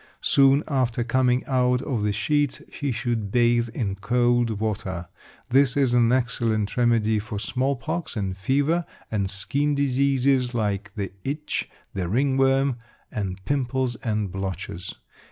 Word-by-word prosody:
Soon 140 +2 +5
after 125 -4 0
coming 125 +1 +2
out 125 -1 +2
of 125 -7 -2
the 105 0 +1
sheets 145 +6 0
he 145 -2 -2
should 115 -4 -2
bathe 120 0 +3
in 110 -4 -2
cold 120 +1 +1
water. 95 -5 -3 0.4
This 135 0 +4
is 135 -4 +3
an 120 -1 +4
excellent 115 -5 0
remedy 115 -3 +2
for 105 0 -5
small 130 +6 -1
pox 160 +6 -4
and 95 -3 -2
fever, 145 - +1 0.2
and 100 -3 0
skin 140 +9 0
diseases 135 -2 +2
like 100 -2 -2
the 100 -2 -3
itch, 150 +3 -3 0.2
the 90 -3 -2
ringworm, 135 +2 +2 0.3
and 95 -2 -4
pimples 130 -2 0
and 105 -4 -2
blotches. 95 -2 -5
120 Hz, 135 wpm, -24 LUFS, 105-135 Hz, 0.4 s, Soon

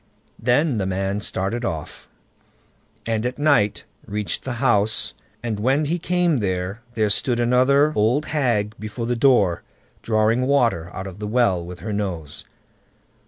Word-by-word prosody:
Then 125 +2 +2
the 95 - -1
man 95 +2 -1
started 105 +4 -2
off, 80 -9 -5 1.0
and 115 -1 -1
at 125 +1 -2
night 145 -9 +2 0.2
reached 105 -4 -2
the 130 - -4
house, 110 - +2 0.3
and 110 -3 -2
when 135 +7 +2
he 170 +4 -1
came 180 -2 +1
there, 95 0 -2
there 110 -2 +1
stood 120 +3 +1
another 130 +5 +3
old 120 +8 +2
hag 120 -8 0
before 110 +2 -5
the 120 +1 0
door, 115 -9 +3 0.4
drawing 115 +3 +1
water 115 -12 +2
out 95 - -6
of 95 0 -9
the 105 - -4
well 105 -6 +2
with 90 +1 -9
her 110 - -4
nose. 90 -8 -4
110 Hz, 150 wpm, -22 LUFS, 100-130 Hz, 1.0 s, another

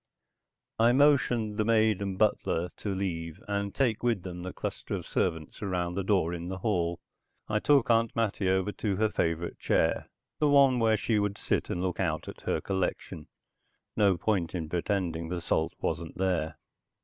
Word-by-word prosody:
I 115 +2 +5
motioned 125 -6 +3
the 110 - +2
maid 110 -2 +3
and 95 -2 -3
butler 90 -5 +1
to 100 -2 -3
leave 85 -3 -3
and 100 0 -1
take 120 -6 +1
with 115 -6 0
them 90 -1 -6
the 90 +1 -5
cluster - - -4
of - - -5
servants 80 -4 -2
around 90 -3 -1
the 100 +1 -2
door 90 -4 +1
in 85 0 -5
the 95 +1 -4
hall. 85 -4 0 0.5
I 105 0 +1
took 140 -1 +4
Aunt 115 0 +2
Mattie 105 -4 0
over 95 +2 +1
to 100 -1 -2
her 110 +3 +2
favorite 85 -3 -1
chair, - - +1 0.3
the 150 -2 +3
one 135 -3 +5
where 110 -1 +3
she 110 -1 +1
could 100 0 -1
sit - - -1
and 90 - -2
look 90 -1 -2
out 80 -5 -1
at - - -9
her - - -1
collection; 95 -1 -3 0.7
no 100 -3 +3
point 95 -4 0
in 80 -3 -3
pretending 85 -2 -1
the 90 0 -2
salt 80 -1 -1
wasn't - - -3
there. 85 -4 0
95 Hz, 180 wpm, -29 LUFS, 85-110 Hz, 0.7 s, I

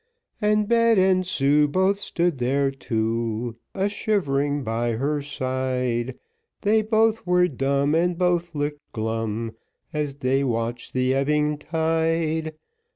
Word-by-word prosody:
And 210 0 +2
Bet 230 -1 +4
and 185 -1 +3
Sue 150 -3 +3
Both 190 +6 +1
stood 170 -7 -1
there 135 +3 +1
too, 115 -2 -2 0.2
A 195 0 +1
shivering 145 - 0
by 115 +1 -1
her 145 +6 -1
side, 130 -3 -2 0.4
They 215 +2 +3
both 220 0 +1
were 180 0 +4
dumb, 140 0 0
And 170 +1 +2
both 175 -2 0
looked 145 0 -2
glum, 110 0 -3 0.4
As 150 -2 -2
they 135 0 +1
watched 120 -1 -2
the 130 0 +1
ebbing 150 +2 +1
tide. 160 0 0
145 Hz, 125 wpm, -24 LUFS, 130-180 Hz, 0.4 s, Bet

